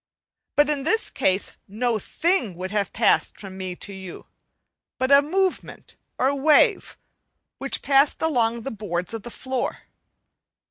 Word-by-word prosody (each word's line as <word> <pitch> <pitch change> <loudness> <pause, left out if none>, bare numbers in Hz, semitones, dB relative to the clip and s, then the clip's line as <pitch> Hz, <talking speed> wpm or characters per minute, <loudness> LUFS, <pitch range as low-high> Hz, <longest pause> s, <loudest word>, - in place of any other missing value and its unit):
But 295 0 +5
in 295 -2 +1
this 400 +11 +1
case 190 +1 +1
no 225 +2 -1
thing 320 - 0
would 185 +2 -5
have 205 -3 -1
passed 225 - +2
from 195 -2 -9
me 185 -1 -5
to 200 - -8
you 190 -2 -9 0.7
but 260 +1 0
a 280 0 +8
movement 370 +5 -2 0.2
or 265 +2 +2
wave, 310 - +3 0.6
which 275 0 -3
passed 275 +1 +3
along 235 -7 +1
the 270 - -4
boards 180 -3 -4
of 225 - -4
the 240 - -9
floor. 260 +1 -4
245 Hz, 145 wpm, -24 LUFS, 200-290 Hz, 0.7 s, a